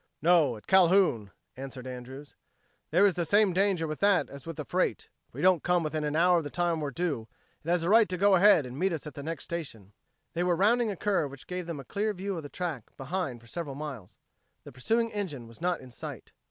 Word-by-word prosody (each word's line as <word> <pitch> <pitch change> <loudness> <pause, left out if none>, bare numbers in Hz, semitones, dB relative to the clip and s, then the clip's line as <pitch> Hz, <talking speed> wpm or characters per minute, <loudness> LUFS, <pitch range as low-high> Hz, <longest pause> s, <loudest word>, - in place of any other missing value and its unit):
"No, 155 -7 +3
at 105 - -16
Calhoun," 180 - +4 0.3
answered 130 -1 -8
Andrews. 130 +3 -9 0.5
"There 180 +6 +4
is 200 - +4
the 175 - -1
same 200 +3 +3
danger 190 -3 +1
with 155 -1 -5
that 200 -2 +3
as 140 +2 -11
with 165 - -5
the 150 - -6
freight. 185 +1 -1 0.2
If - - -25
we - - -4
don't 185 -4 +5
come 180 -1 +1
within 155 0 -2
an 150 0 -1
hour 175 +2 +4
of - - -5
the 145 - -5
time 175 -1 0
we're 145 - -2
due, 140 -7 -2 0.4
it 165 - -6
has 175 -1 +2
a 170 - 0
right 225 -1 +6
to 180 - -2
go 200 +2 +4
ahead 190 -5 +6
and 125 +2 -8
meet 190 0 +1
us 160 - -5
at 150 - -7
the 140 - -7
next 165 +3 -5
station." 115 - -6 0.4
They 170 - -1
were 175 -1 +2
rounding 225 +6 +3
a 200 - -3
curve 190 -6 0
which 135 -1 -12
gave 180 -1 -5
them 165 -4 -5
a 135 - -9
clear 210 - -2
view 195 +1 -3
of 165 - -4
the 145 - -9
track 165 -11 -5
behind 135 -4 -3
for - - -18
several 145 +1 -5
miles. 140 -10 -8 0.5
The - - -11
pursuing 225 - 0
engine 155 - -4
was 115 +6 -15
not 175 -1 0
in 130 -1 -12
sight. - - -8
165 Hz, 245 wpm, -29 LUFS, 140-185 Hz, 0.5 s, right